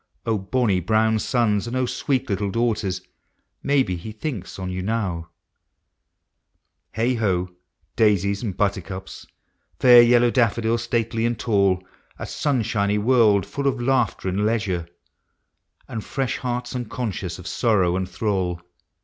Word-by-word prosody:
O 110 -2 0
bonny 100 -1 +1
brown 110 +4 +2
sons, 115 -3 +1
and 120 - -4
O 130 0 +1
sweet 130 +1 -1
little 100 -1 -1
daughters. 105 -4 -1 0.6
Maybe 135 -9 +1
he 100 +6 -7
thinks 110 - -6
on 95 -1 -4
you 90 0 -3
now! 95 -5 -2 1.6
Heigh 115 +3 +1
ho! 90 -4 0 0.4
daisies 100 -2 +2
and 100 -6 -4
buttercups, 95 -2 -3 0.5
Fair 125 -1 +8
yellow 120 0 +5
daffodils, 115 -1 +1
stately 115 -1 -1
and 120 0 0
tall 100 -5 +1 0.2
— - - -34
A - - -5
sunshiny 110 -7 0
world 105 -3 +4
full 140 0 -3
of 135 -2 0
laughter 120 -6 0
and 95 +3 0
leisure, 105 -6 -1 1.0
And 110 -2 -5
fresh 135 -2 -2
hearts 125 0 -3
unconscious 110 -6 -4
of 90 - -11
sorrow 95 -5 +1
and 95 0 -2
thrall 90 -2 -1
110 Hz, 135 wpm, -23 LUFS, 95-120 Hz, 1.6 s, Fair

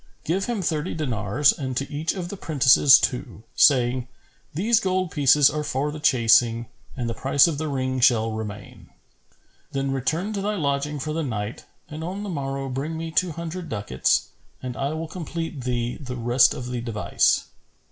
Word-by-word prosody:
Give 190 +5 -1
him 230 -5 -2
thirty 155 -3 -2
dinars 125 -2 +1
and 130 -3 -5
to 140 - -2
each 155 +3 -1
of 175 -2 -5
the 200 - -5
prentices 140 -5 +5
two, 125 -4 -3
saying, 125 -2 +3 0.4
'These 215 +9 +2
gold 185 -4 -1
pieces 145 0 +5
are 150 0 -3
for 145 +1 -2
the 155 - -7
chasing 120 -4 +3 0.3
and 120 -2 -2
the 115 - -2
price 135 +5 +3
of 155 -4 -2
the 155 - -2
ring 130 -2 -2
shall 115 -3 +3
remain.' 105 -2 -8 0.8
Then 135 0 -1
return 160 - -1
to 200 - -3
thy 210 +2 -1
lodging 145 -3 -1
for 155 +3 -3
the 165 - -1
night 110 -6 -4 0.2
and 155 +1 -7
on 190 +5 -5
the 205 - -5
morrow 135 -4 -3
bring 140 +5 -4
me 165 0 -5
two 170 +1 +1
hundred 170 +2 -6
ducats, 100 - 0 0.3
and 125 -1 -6
I 140 +2 -2
will 160 +1 -4
complete 165 -4 -6
thee 120 -1 -2
the 130 -4 -7
rest 120 +2 +4
of 125 -1 -6
the 125 -1 -3
device." 115 -3 +1
140 Hz, 180 wpm, -24 LUFS, 125-160 Hz, 0.8 s, prentices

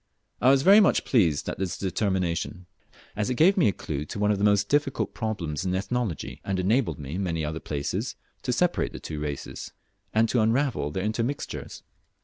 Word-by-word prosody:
I 125 - +5
was 135 0 +5
very 200 +5 +8
much 205 - +3
pleased 85 - +2
at - - -4
this 95 -3 -2
determination, 95 -1 -1 0.5
as 105 +3 -1
it 125 - 0
gave 175 +9 +5
me 180 - +4
a - - +4
clue 75 -6 -4
to 75 - -7
one 105 +1 +2
of 100 - 0
the - - -1
most 100 -1 +3
difficult 145 0 0
problems 90 -9 -3
in 95 -1 -1
Ethnology, 100 - -3
and 95 -1 -2
enabled 95 - +1
me 70 0 -7
in 95 - -2
many 80 -4 -1
other 80 +1 -3
places 70 -3 -3 0.3
to - - -1
separate - - +1
the - - -7
two 75 - -6
races, 75 -2 -5 0.4
and 110 +1 +3
to 120 - +2
unravel 115 - +1
their 95 +5 -3
intermixtures. 115 +6 -3
100 Hz, 195 wpm, -26 LUFS, 85-120 Hz, 0.5 s, very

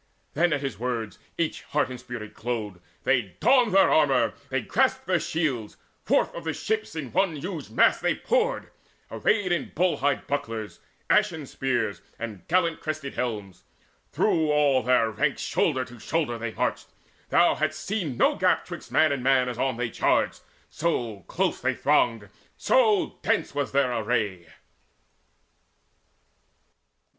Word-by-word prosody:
Then 170 +3 +2
at 145 -2 0
his 135 -4 -4
words 120 -3 -3 0.2
each 165 -2 -1
heart 145 -3 -1
and 125 - -7
spirit 120 -4 -8
glowed: 110 -6 -4 0.2
They 120 -9 +1
donned 245 -1 +4
their 195 - +6
armour, 140 -5 +4
and - - -2 0.2
they 135 0 0
grasped 260 - +1
their 185 -2 +2
shields. 140 -11 -2 0.3
Forth - - +2
of - - -7
the - - -2
ships 440 - -2
in 145 -6 -5
one 185 -2 +1
huge 165 +2 -6
mass - - +4
they - - +1
poured - - 0 0.4
Arrayed 205 -4 +1
with 175 - -2
bull 180 +2 +2
hide 140 0 0
bucklers, 115 -6 -4 0.3
ashen 155 -3 +2
spears, 120 -6 -2 0.2
And 110 -4 -7
gallant 170 -2 +2
crested 155 -3 -4
helms. 105 -7 -4 0.5
Through 160 -2 +2
all 145 -3 +3
their 120 -2 +2
ranks 140 +7 -1
Shoulder 130 -5 +1
to 120 -1 -13
shoulder 120 -4 -1 0.2
marched - - -1 0.4
they: - - +1
thou - - +6
hadst 155 0 -2
seen 180 - -2
No - - +4
gap - - +2
'twixt - - -9
man 155 -1 +4
and 140 -2 -1
man 130 -1 +3
as 125 -1 -5
on 130 -3 0
they 120 -2 -2
charged; - - +1 0.3
So 120 -10 -1
close - - -1
they - - 0
thronged, 115 -4 +2 0.3
so 440 -7 +2
dense - - 0
was 145 -2 -2
their 135 -2 +2
array. 105 -6 -1
140 Hz, 155 wpm, -26 LUFS, 120-165 Hz, 0.5 s, their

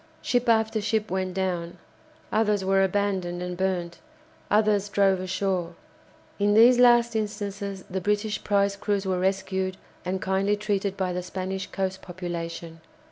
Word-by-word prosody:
Ship 245 -1 +1
after 220 -1 +2
ship 215 0 -1
went 185 -1 -2
down, 175 -3 -2 0.5
others 210 -3 +1
were 195 0 +3
abandoned 190 -2 -1
and 180 0 -4
burnt, 175 -2 -2 0.5
others 210 -1 +2
drove 195 -2 +3
ashore. 185 -2 -2 0.6
In 205 +1 +3
these 240 +3 +7
last 240 -1 +5
instances 200 -2 -3
the 190 +1 -3
British 210 +2 -1
prize 200 -1 +2
crews 200 0 -1
were 185 -1 0
rescued 190 0 -1 0.3
and 185 +1 -2
kindly 195 +2 +1
treated 200 -2 -1
by 185 -2 -1
the 180 - -2
Spanish 185 +1 -4
coast 190 -1 -3
population. 170 -2 -6
195 Hz, 140 wpm, -26 LUFS, 185-205 Hz, 0.6 s, these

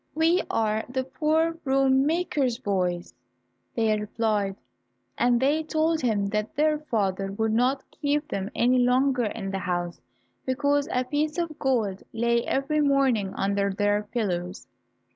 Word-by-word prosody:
"We 330 +3 +3
are 220 0 0
the 260 +1 -1
poor 315 +4 +1
broom 270 -3 +2
maker's 300 -7 0
boys," 180 -6 -2 0.6
they 225 -2 +2
replied, 210 -2 -1 0.6
and 245 0 +2
they 285 +5 +2
told 315 +1 0
him 215 -5 +1
that 210 +1 -2
their 305 +1 +2
father 195 -8 -1
would 220 +1 0
not 255 +4 +1
keep 295 0 -1
them 195 0 -3
any 250 +2 +3
longer 250 0 +2
in 205 -2 -4
the 195 - -2
house 175 -2 -3 0.4
because 285 +2 0
a 250 - +1
piece 300 +4 -1
of 335 -3 -3
gold 225 -8 0
lay 235 +1 +1
every 300 +3 0
morning 270 -8 +2
under 200 0 0
their 205 +1 +1
pillows. 180 -5 -2
245 Hz, 145 wpm, -26 LUFS, 205-285 Hz, 0.6 s, We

